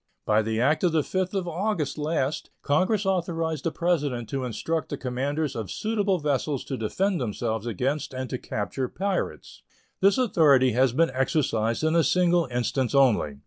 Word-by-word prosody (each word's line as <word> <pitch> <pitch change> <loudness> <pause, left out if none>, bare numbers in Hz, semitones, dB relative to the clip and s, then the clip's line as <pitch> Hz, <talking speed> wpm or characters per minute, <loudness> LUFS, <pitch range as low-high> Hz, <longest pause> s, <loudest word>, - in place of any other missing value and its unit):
By 105 +1 +3
the 110 +1 -2
act 145 +8 +2
of 175 -3 +2
the 155 -2 +2
5th 185 +4 -2
of 190 -2 -1
August 170 -4 -2
last 150 -2 -1
Congress 185 +8 +1
authorized 165 -5 -1
the 165 - +1
President 145 -10 -1
to 135 -2 -2
instruct 135 +6 -3
the - - -4
commanders 140 +4 -2
of 110 -5 -4
suitable 205 - 0
vessels 145 -2 -1
to 135 - -4
defend 180 - -1
themselves 110 0 -2
against 135 +7 -2
and 130 0 -4
to 130 - -3
capture 105 +6 -3
pirates. 195 +7 -3 0.4
This 195 +3 +4
authority 150 - +4
has 125 +2 +3
been 165 +4 +2
exercised 130 -3 0
in 160 +1 +2
a 165 - +4
single 175 +1 +3
instance 125 +2 -1
only. 115 - +3
145 Hz, 170 wpm, -26 LUFS, 125-170 Hz, 0.4 s, This